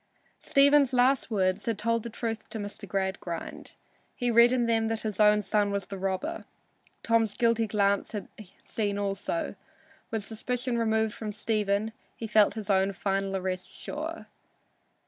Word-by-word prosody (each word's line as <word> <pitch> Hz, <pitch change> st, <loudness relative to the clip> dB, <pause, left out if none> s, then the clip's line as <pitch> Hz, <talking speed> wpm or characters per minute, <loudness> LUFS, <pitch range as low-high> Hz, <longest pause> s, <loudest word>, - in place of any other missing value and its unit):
Stephen's 280 Hz, -1 st, +4 dB
last 255 Hz, +2 st, +3 dB
words 190 Hz, -1 st, 0 dB
had 225 Hz, -3 st, 0 dB
told 230 Hz, +1 st, 0 dB
the 235 Hz, -, -6 dB
truth 225 Hz, -1 st, -4 dB
to 225 Hz, -, -5 dB
Mr. 205 Hz, 0 st, -7 dB
Gradgrind. 190 Hz, -2 st, -4 dB, 0.4 s
He 245 Hz, -2 st, 0 dB
read 235 Hz, +1 st, +7 dB
in 250 Hz, -2 st, +2 dB
them 225 Hz, -1 st, +2 dB
that 225 Hz, 0 st, -2 dB
his 215 Hz, -2 st, -4 dB
own 210 Hz, 0 st, +5 dB
son 205 Hz, -1 st, +1 dB
was 200 Hz, -1 st, -2 dB
the 195 Hz, -, -7 dB
robber. 195 Hz, -, -2 dB, 0.6 s
Tom's 225 Hz, -2 st, +2 dB
guilty 230 Hz, -1 st, +2 dB
glance 200 Hz, -1 st, +1 dB
had 210 Hz, -, -4 dB, 0.4 s
seen 205 Hz, -2 st, -2 dB
also. 195 Hz, -4 st, -2 dB, 0.6 s
With 220 Hz, -2 st, -2 dB
suspicion 245 Hz, +3 st, -2 dB
removed 220 Hz, -1 st, +1 dB
from 215 Hz, -2 st, -5 dB
Stephen, 210 Hz, 0 st, 0 dB, 0.2 s
he 230 Hz, -, -6 dB
felt 210 Hz, -1 st, +4 dB
his 215 Hz, -2 st, -2 dB
own 195 Hz, 0 st, +2 dB
final 195 Hz, 0 st, -1 dB
arrest 185 Hz, -1 st, -3 dB
sure. 320 Hz, +3 st, -6 dB
215 Hz, 155 wpm, -28 LUFS, 200-230 Hz, 0.6 s, read